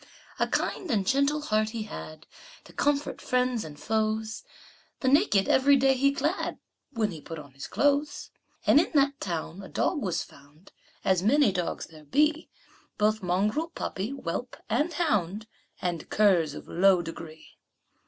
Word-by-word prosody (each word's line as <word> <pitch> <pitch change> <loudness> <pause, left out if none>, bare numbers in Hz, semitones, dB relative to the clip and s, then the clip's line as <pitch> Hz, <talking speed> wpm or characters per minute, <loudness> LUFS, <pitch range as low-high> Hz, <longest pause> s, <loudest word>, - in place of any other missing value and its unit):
A - - +2
kind 365 - -2
and 210 -7 +1
gentle 280 +6 +2
heart 215 -6 +1
he 225 -1 -4
had, 155 -6 -9 0.4
To - - -16
comfort 290 0 0
friends 250 -2 0
and 150 -2 -10
foes; 220 +1 -1 0.6
The 260 - 0
naked 265 - +4
every 280 +2 +5
day 270 0 +4
he 275 +2 +3
clad 295 +6 -1 0.3
When 220 -6 0
he 160 -3 -8
put 165 - -8
on 145 -3 -10
his 135 0 -8
clothes. 290 +1 0 0.3
And - - +6
in 330 - +1
that 280 0 +3
town 170 0 -4
a 190 - -10
dog 305 - 0
was 175 -4 -1
found, 145 +6 -19 0.3
As 190 -2 +3
many 265 +4 +4
dogs 180 -2 -3
there 155 -2 -15
be, 300 - +1 0.5
Both 215 +1 +2
mongrel, 205 - 0
puppy, 200 - -4
whelp 250 -2 -5
and 295 +9 +1
hound, 215 - 0 0.4
And 175 -3 -3
curs 175 -8 +3
of - - -9
low 185 0 +4
degree. 165 -1 -10
215 Hz, 160 wpm, -27 LUFS, 175-280 Hz, 0.6 s, And